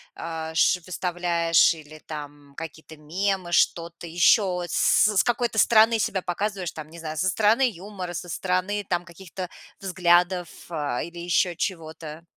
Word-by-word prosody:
а, 160 -1 -5
ш 180 +2 +4
выставляешь, 175 -2 +2
или 155 -1 -12
там 145 -2 -9
какие-то 160 -1 -9
мемы, 180 +3 -2
что-то 170 0 +1
еще, 180 +1 +3
с 210 +3 +3
с - - +5
какой-то 240 -2 0
стороны 225 0 +5
себя 190 -2 0
показываешь? 190 0 -3
Там, 155 -1 -9
не 170 +1 -12
знаю, 155 -1 -6
со 185 +4 +1
стороны 220 +7 +3
юмора, 185 -1 -7
со 175 +1 -6
стороны 185 +4 -1
там 175 -1 0
каких-то 180 +1 -8 0.3
взглядов, 180 -1 +2 0.2
а, 145 -6 -2
или 170 +1 -8
еще 175 0 +1
чего-то. 160 -2 -5
175 Hz, 145 wpm, -25 LUFS, 160-190 Hz, 0.3 s, с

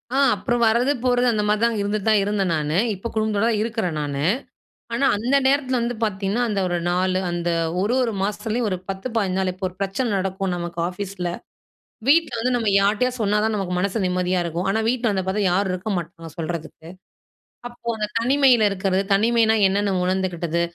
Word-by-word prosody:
ஆ. - - +2 0.2
அப்றம் 240 +4 -1
வரது, 240 +5 +3
போறது, 245 0 +2
அந்த 210 -1 0
மாதிரி 210 +1 +1
தான் 235 -2 0
இருந்துட்டு 205 +1 -2
தான் 210 -2 +4
இருந்தேன் 200 -3 0
நானு. 155 +1 -1 0.2
இப்போ 195 +5 -6
குடும்பத்தோடு 215 0 +1
தான் 215 -2 0
இருக்குறேன் 220 -8 -2
நானு. 145 -1 -3 0.7
ஆனா 260 +4 +1
அந்த 250 +6 +1
நேரத்தில 265 -2 +2
வந்து 240 0 -2
பாத்திங்கன்னா, 200 +2 -1
அந்த 200 -2 -1
ஒரு 175 - -1
4 185 +1 +1
அந்த 175 0 -2 0.3
ஒரு 215 +5 +1
ஒரு 235 - 0
மாசத்துலேயும் 220 +3 -1
ஒரு 185 - -1
10, 195 +5 -4
15 190 -3 0
நாள். 190 -1 0
இப்போ 185 +1 -5
ஒரு 180 - -19
பிரச்சனை 195 +5 -1
நடக்கும் 190 0 -2
நமக்கு 175 -1 -5
ஆஃபீஸில, 180 -1 -4 0.8
வீட்ல 310 -3 +4
வந்து 255 +2 0
நம்ம 225 -3 0
யார்ட்டயாது 240 +5 +1
சொன்னா 210 0 +2
தான் 220 0 +1
நமக்கு 185 -2 -2
மனசு 200 +4 -1
நிம்மதியா 180 0 0
இருக்கும். 170 +1 -3
ஆனா 220 - +1
வீட்ல 245 -1 +1
வந்து 190 -1 -1
பாத்தா, 205 +2 0
யாரும் 190 +1 +1
இருக்க 185 +4 -4
மாட்டாங்க 165 -1 -6
சொல்றதுக்கு. 165 0 -6 0.8
அப்போ 240 -1 -14
அந்த 210 -1 -1
தனிமையில 250 -2 +4
இருக்குறது. 190 0 0
தனிமைனா 225 +1 +3
என்னென்னு 200 0 0
உணர்ந்துக்கிட்டது, 180 -3 -1
200 Hz, 180 wpm, -22 LUFS, 185-230 Hz, 0.8 s, தான்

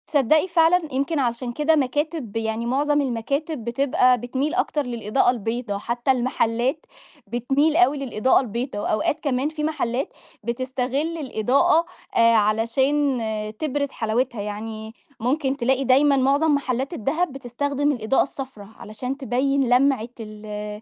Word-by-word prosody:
تصدّقي 305 +3 +3
فعلًا 345 0 +4
يمكن 280 +4 0
علشان 240 -1 -1
كده 300 +5 +2
مكاتب 290 -3 -1
يعني 225 +1 -2
معظم 290 +4 +1
المكاتب 275 +3 -2
بتبقى 250 +1 +2
بتميل 260 +6 -2
أكتر 355 -5 0
للإضاءة 235 0 +1
البيضا، 230 -2 -3
حتّى 240 +5 0
المحلات 250 +2 0 0.4
بتميل 270 +7 +1
أوي 325 -5 +4
للإضاءة 260 -2 +2
البيضا 240 -1 -4
وأوقات 215 +8 0
كمان 275 0 0
في 310 -1 -5
محلات 275 -4 -2 0.3
بتستغِل 260 +6 -2
الإضاءة 285 - +2 0.3
آآ 230 0 +5
علشان 245 +6 +2 0.4
تبرز 285 -2 -1
حلاوتها. 225 0 -1
يعني 220 +1 -6 0.3
ممكن 270 +3 0
تلاقي 265 +2 +1
دايمًا 275 +2 +4
معظم 285 +4 +3
محلّات 265 +1 -2
الدهب 315 +4 -1
بتستخدم 280 +3 -1
الإضاءة 245 -1 +1
الصفرا 265 -7 -8
علشان 250 +5 -6
تبيّن 270 0 0
لَمعة 250 -2 +3
ال 210 -1 -7
260 Hz, 125 wpm, -23 LUFS, 230-285 Hz, 0.4 s, آآ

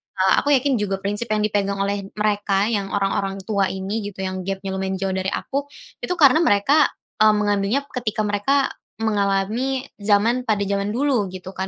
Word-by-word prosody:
eee, 190 0 +3
aku 285 0 +3
yakin 260 -3 +1
juga 195 -2 -1
prinsip 205 +4 -1
yang 210 0 +1
dipegang 200 -1 0
oleh 200 0 -2
mereka 205 0 +1
yang 200 -3 -1
orang-orang 195 -1 0
tua 200 -2 +1
ini 190 +3 -3
gitu, 190 -1 -7
yang 185 0 -3
gepnya 195 0 -3
lumayan 190 0 -2
jauh 195 0 -2
dari 190 0 -2
aku, 280 +8 -3 0.3
itu 360 - -2
karena 300 -2 +6
mereka, 290 +1 +4 0.3
mmm, 215 0 +6
mengambilnya 205 +5 +1
ketika 220 -4 -2
mereka 210 +7 +1 0.2
mengalami 220 +5 0 0.2
zaman 220 +5 +2
pada 205 -2 +1
zaman 200 0 -1
dulu 255 -6 +1
gitu 185 0 -8
kan, 190 0 -4
205 Hz, 175 wpm, -22 LUFS, 195-235 Hz, 0.3 s, karena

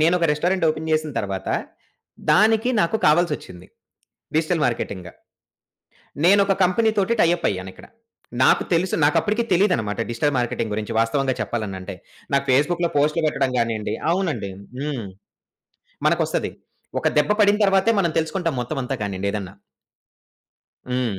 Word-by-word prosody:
నేనొక 170 +2 +3
restaurant 175 +4 0
open 155 +1 -2
జేసిన 155 -1 +1
తర్వాత 95 -2 -4 0.8
దానికి 220 +3 +4
నాకు 170 +6 +1
కావాల్సొచ్చింది. 150 - 0 0.7
Digital 160 0 +1
marketing. 100 -6 -3 1.2
నేనొక 200 +1 +5
కంపెనీతోటి 210 +3 +2
టై - - +5
అప్ - - -2
అయ్యానిక్కడ. 95 -1 -6 0.6
నాకు - - +5
తెలుసు 175 +2 +1
నాకప్పటికి 205 +10 +2
తెలీదనమట 170 - +1
డిజిటల్ 145 +5 0
మార్కెటింగ్ 115 -3 -2
గురించి 110 +1 -4
వాస్తవంగా 130 +4 +1
చెప్పాలనంటే. 100 -3 -4 0.4
నాకు 140 0 +2
ఫేస్‌బుక్‌లో 170 +6 +2
పోస్టులు 150 +3 +2
పెట్టడం 135 -3 0
గానియండి 115 -2 -1 0.2
అవునండి. 170 - -1 0.3
హ్మ్. 140 -7 -3 1.0
మనకొస్తది. - - 0 0.5
ఒక - - +1
దెబ్బ 150 +7 +3
పడిన 205 0 +5
తర్వాతే 195 +2 +3
మనం 170 -4 +1
తెలుసుకుంటాం 165 +1 -1
మొత్తం 140 +5 -5
అంతా 135 +2 -3
కానియండి 100 -1 -2
ఏదన్నా. 100 -2 -5 1.4
హ్మ్. 125 -6 -1
150 Hz, 120 wpm, -22 LUFS, 115-175 Hz, 1.4 s, నేనొక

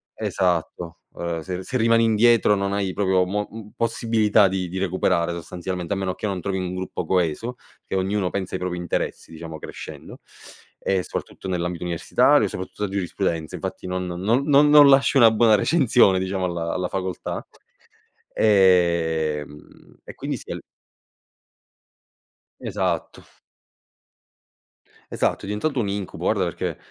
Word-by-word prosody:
esatto, 85 -1 -2 0.2
ehm, 85 -1 -3
se 90 +2 -5
se 130 - -6
rimani 115 0 +4
indietro 115 -1 +4
non 100 0 -1
hai 100 -2 -1
proprio 95 -2 +2
mo 105 +3 -2 0.3
possibilità 110 -2 +2
di 95 -1 -2
di 95 - -5
recuperare 90 -2 0
sostanzialmente, 90 +2 -5
a - - 0
meno 95 -1 -2
che 105 - -4
non 95 -2 -2
trovi 95 +1 -2
un 90 0 -4
gruppo 95 0 -4
coeso, 90 +7 -1 0.3
che - - -4
ognuno 95 0 0
pensa 95 -1 -4
ai 95 - -2
propri 90 -1 -3
interessi 85 -1 -3
diciamo, 80 0 -8
crescendo - - -9 0.6
e 95 -1 0
soprattutto - - -7
nell'ambito 90 -1 -2
universitario, 85 -2 +3
soprattutto 95 +2 -6
a 105 - -1
giurisprudenza, 90 -4 -2
infatti, - - -6
non 90 0 -2
non 95 +9 0
non 145 0 +5
non 145 -1 +8
lasci 135 0 +4
una 115 -3 +7
buona 110 0 +5
recensione, 115 - +4
diciamo, 95 0 -2
alla 85 -2 -2
alla 90 -1 -2
facoltà, 95 -2 -4 0.9
ehm, 85 -7 +1
e - - -10
quindi - - -4
sì, - - -12
al - - -6 2.0
Esatto. 90 -5 -3 1.9
Esatto, - - 0
è - - -8
diventato 105 +8 -2
un 110 -4 0
incubo, 100 -1 -5
guarda - - +1
perché - - -3
95 Hz, 145 wpm, -23 LUFS, 90-105 Hz, 2.0 s, non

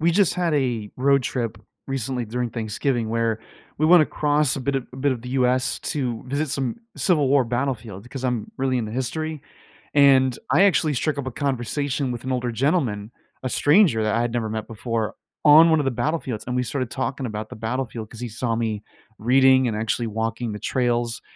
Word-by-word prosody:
We 165 +2 +3
just 185 0 +3
had 175 -3 0
a 120 -7 -1
road 140 +1 +3
trip 115 -4 -3 0.3
recently 130 -2 -2
during 120 +2 -3
Thanksgiving 115 +2 -1
where 115 -1 0 0.4
we 155 - +3
went 175 0 +8
across 150 -2 +1
a - - -3
bit 140 +2 -1
of 130 - -3
a - - -10
bit 135 +1 +1
of 120 - -6
the 125 - -7
US 130 0 +1
to 125 -6 -2
visit 145 +4 -1
some 135 -3 -2 0.2
Civil 150 -7 +2
War 135 -1 +4
battlefield 120 -4 -3
'cause 130 0 -7
I'm 125 -4 -1
really 130 -1 0
into 110 -3 -3
history, 150 +5 -3 0.5
and 135 -3 +5
I 160 +8 +5
actually 160 -6 +3
strick 145 +3 -1
up 140 -2 -3
a 130 - -3
conversation 140 0 -2
with 120 -2 -6
an 130 - -3
older 125 -1 -1
gentleman, 120 - 0 0.3
a 130 - -1
stranger 145 - +4
that 110 -1 +1
I 115 - +2
had 120 -1 -1
never 115 -3 -1
met 110 0 -4
before, 115 0 -3 0.3
on 155 +3 +8
one 160 -1 +4
of 145 - -1
the 135 - +1
battlefields, 125 -2 -2
and 125 - -2
we 125 - +1
started 125 +1 -3
talking 135 +1 -3
about 110 -1 -5
the - - -8
battlefield 115 -1 -4
'cause 115 - -11
he 125 - -4
saw 115 +1 -2
me 110 -3 -2 0.4
reading 130 +2 +5
and 110 -2 -2
actually 115 +2 -1
walking 110 +2 -2
the 105 - -6
trails, 120 -1 -1
125 Hz, 205 wpm, -23 LUFS, 115-140 Hz, 0.5 s, went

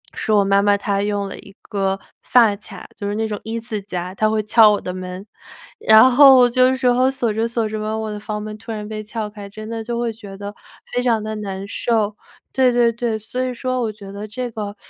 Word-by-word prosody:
是 220 - -2
我 205 -1 +4
妈 195 0 +3
妈 205 0 +3
她 200 0 -1
用 205 -1 -1
了 - - -8
一 195 0 -15
个 195 -1 -2 0.2
发 225 -5 +4
卡， 200 -2 -11
就 200 - -5
是 205 - -2
那 220 +1 -1
种 210 -2 -4
一 225 +1 -4
字 220 -3 -4
夹， 180 -2 -5
她 215 +2 +2
会 215 -1 0
撬 215 0 +6
我 205 - 0
的 180 - -5
门， 185 +1 -7 0.5
然 220 +4 +7
后 265 -1 +8
就 255 +1 +4
有 260 - +2
时 260 - -5
候 250 +2 +4
锁 240 -5 -1
着 225 +2 0
锁 230 -1 -1
着 215 0 -4
吧， 215 +1 -2
我 220 -1 -4
的 210 - -5
房 210 0 -5
门 215 0 -6
突 225 - -8
然 210 -1 -5
被 215 0 -5
撬 215 0 -4
开， 205 -1 -10
真 215 +2 -9
的 225 -1 -4
就 235 +1 -3
会 235 -1 -1
觉 205 -3 -11
得 205 0 -7 0.4
非 245 - +1
常 230 -3 +1
地 215 0 -4
难 195 -2 -5
受。 215 -1 0 0.4
对 260 -1 +4
对 240 -1 +3
对， 230 -1 -2
所 250 +4 -4
以 255 - -2
说 255 +1 -2
我 220 - -1
觉 200 -2 -11
得 205 +1 -7
这 245 +3 -5
个， 210 -2 -5
215 Hz, 265 characters per minute, -20 LUFS, 205-235 Hz, 0.5 s, 后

